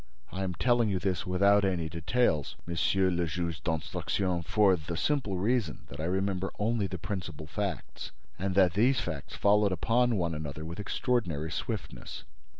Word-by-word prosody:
I 95 - -4
am 95 -2 -2
telling 120 +3 +3
you 95 - +1
this 90 -1 -1
without 100 +3 +4
any 90 -4 0
details, 85 - 0
Monsieur 95 +3 +2
le 85 -1 0
Juge 85 -2 -3
d'Instruction, 85 +3 -1
for 100 +3 +4
the 80 0 -5
simple 125 - 0
reason 105 -3 0
that 70 - -9
I 80 - -2
remember 95 +1 -1
only 105 -1 +1
the 90 0 -5
principal 85 -7 -5
facts, 95 +2 -4 0.3
and 95 0 -1
that 95 -4 +5
these 125 +7 +3
facts 70 -3 -5
followed 105 0 +4
upon 115 +7 +2
one 85 -4 0
another 75 0 -5
with 85 +3 -6
extraordinary 100 - -1
swiftness." - - -5
95 Hz, 160 wpm, -30 LUFS, 85-105 Hz, 0.3 s, that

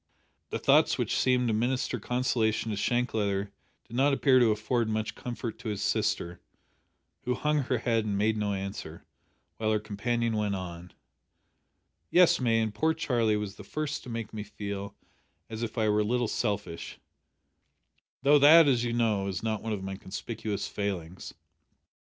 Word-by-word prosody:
The - - -2
thoughts - - +4
which - - -1
seemed 125 -1 +2
to 115 - +1
minister 125 +2 0
consolation 115 -2 0
to - - -2
Shank 120 +4 0
Leather 100 -2 -1 0.4
did 115 - -9
not 140 +3 +3
appear 135 -1 +4
to 120 -2 +5
afford 110 +2 0
much 110 0 -2
comfort 120 -2 -6
to 115 - -5
his 105 -2 -3
sister, 85 0 -1 0.8
who 125 - 0
hung 150 +4 +1
her 130 -2 0
head 115 -1 +1
and 105 -2 -2
made 110 +2 +2
no 105 -1 -1
answer, 95 0 -6 0.5
while 110 -1 0
her 110 - +2
companion 115 +2 -1
went 105 -2 0
on 90 -2 -7 1.2
"Yes, 180 -1 +5
May, 115 -3 +2
and 110 -2 -1
poor 160 +7 +1
Charlie 120 -9 +1
was 105 -1 -5
the - - -9
first 155 0 -3
to - - -11
make 115 -2 -5
me 110 - -4
feel 100 -1 -6 0.6
as 110 0 -5
if 115 0 -4
I 110 -1 +2
were 105 0 +3
a - - +3
little 120 +2 0
selfish, 100 -7 -3 1.3
though 145 +1 +6
that 155 +3 +8
as 125 -4 +3
you 120 -1 -1
know, 110 -4 +1
is 95 -1 -4
not 110 -2 -1
one 110 - -4
of 100 -3 -3
my 95 0 -5
conspicuous 105 +2 -5
failings! 95 -4 -5
110 Hz, 175 wpm, -29 LUFS, 105-125 Hz, 1.3 s, that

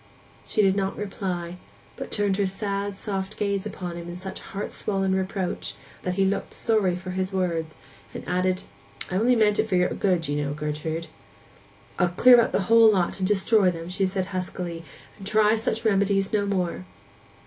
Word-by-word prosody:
She 215 - +2
did 190 -1 +4
not 195 -1 -1
reply, 180 -4 -4 0.4
but - - -6
turned 205 -2 +1
her 200 - +2
sad, 200 0 -3
soft 195 0 -4
glance 200 0 -1
upon 180 -4 -6
him 170 0 -7
in 175 - -6
such 190 +1 -7
heart 200 +1 -6
swollen 195 -2 0
reproach 190 -1 -2 0.3
that 180 0 -2
he 195 0 +3
looked 195 +1 -1
sorry 210 -6 +2
for 185 +1 -6
his 185 +1 -2
words, 170 -4 -2 0.3
and - - -8
added, 185 +1 0 0.5
'I 185 - 0
only 240 +5 +4
meant 210 -2 +3
it 220 - +1
for 190 - +1
your 180 0 +3
good, 180 -5 0
you 145 +1 -1
know, 145 0 -3
Gertrude.' 150 +2 -3 0.9
'I'll 180 - +3
clear 245 -1 +8
out - - 0
the - - +1
whole 225 +2 +6
lot, 185 -2 0
and 185 - +1
destroy 205 0 +3
them,' 170 0 -5
said 190 0 0
she 185 - -10
huskily, 180 -2 -4 0.4
'and 195 - -7
try 215 +1 +4
such 225 0 -2
remedies 195 -1 +2
no 205 -1 +1
more! 180 - -1
190 Hz, 185 wpm, -25 LUFS, 180-205 Hz, 0.9 s, clear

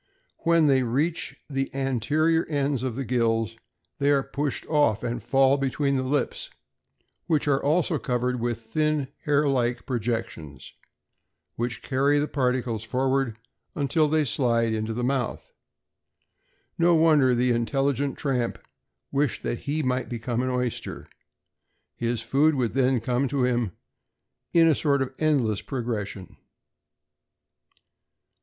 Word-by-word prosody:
When 165 -1 +3
they 135 -2 +4
reach 140 +8 -1
the 135 -1 -2
anterior 140 +5 +1
ends 140 -3 0
of 130 -3 -3
the 135 +1 -3
gills, 115 -2 0 0.4
they 140 0 +2
are 140 -1 +3
pushed 145 0 -3
off, 145 -9 +2
and 120 0 -3
fall 135 0 +3
between 140 +1 0
the 130 - +1
lips, 135 +2 -1 0.8
which 155 -3 +1
are 140 -1 +2
also 160 +1 +2
covered 125 +2 -1
with 120 -1 -2
thin 150 +4 -1 0.2
hair 150 0 +3
like 125 -3 0
projections, 115 - -4 0.8
which 120 -1 -3
carry 140 +2 +2
the 145 +1 +1
particles 125 -5 -1
forward 130 0 0 0.4
until 150 +1 +2
they 155 0 +2
slide 115 -3 +1
into 110 0 -2
the 120 +2 -3
mouth. 130 -1 -2 1.3
No 170 0 +5
wonder 150 -6 +4
the 125 +1 +2
intelligent 135 +4 0
tramp 125 -5 -1 0.5
wished 140 -2 0
that 120 - -2
he 155 +2 0
might 130 0 -1
become 120 0 -2
an 130 - -1
oyster. 125 -2 -3 0.9
His 120 -1 -1
food 145 +6 +3
would 125 -4 0
then 130 -2 +2
come 125 +2 0
to 135 -1 0
him 120 -6 0 0.8
in 165 -1 +5
a 160 - +5
sort 140 -2 +1
of 130 0 -7
endless 130 -10 +1
progression. 110 -7 -5
130 Hz, 135 wpm, -25 LUFS, 120-145 Hz, 1.3 s, No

